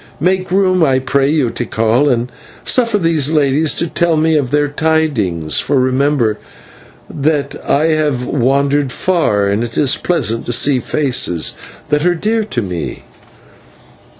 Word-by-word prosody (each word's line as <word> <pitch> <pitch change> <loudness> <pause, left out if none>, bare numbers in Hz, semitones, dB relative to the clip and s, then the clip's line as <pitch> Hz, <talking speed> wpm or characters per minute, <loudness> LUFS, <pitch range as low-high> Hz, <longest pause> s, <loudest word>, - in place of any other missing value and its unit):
Make 185 +4 0
room, 185 -1 +2
I 135 -4 +3
pray 135 +1 0
you, 145 -6 +1
Tikal, 120 +3 0
and 120 -1 -1 0.3
suffer 230 -4 +2
these 165 -6 +1
ladies 150 0 +2
to 170 - -1
tell 170 0 0
me 160 +1 +2
of 140 -4 0
their 145 +1 +1
tidings, 145 - 0
for 140 -1 0
remember 130 -3 +1 0.7
that 145 -1 -1
I 155 +3 +1
have 150 -5 0
wandered 140 +1 0
far, 120 - 0
and 100 +3 0
it 115 -1 -6
is 140 -3 +2
pleasant 115 -10 -1
to 120 - -1
see 135 +2 +2
faces 125 - 0 0.4
that 150 0 +1
are 175 0 +2
dear 220 +6 -1
to 125 - -3
me." 90 -4 -5
145 Hz, 150 wpm, -15 LUFS, 125-160 Hz, 0.7 s, I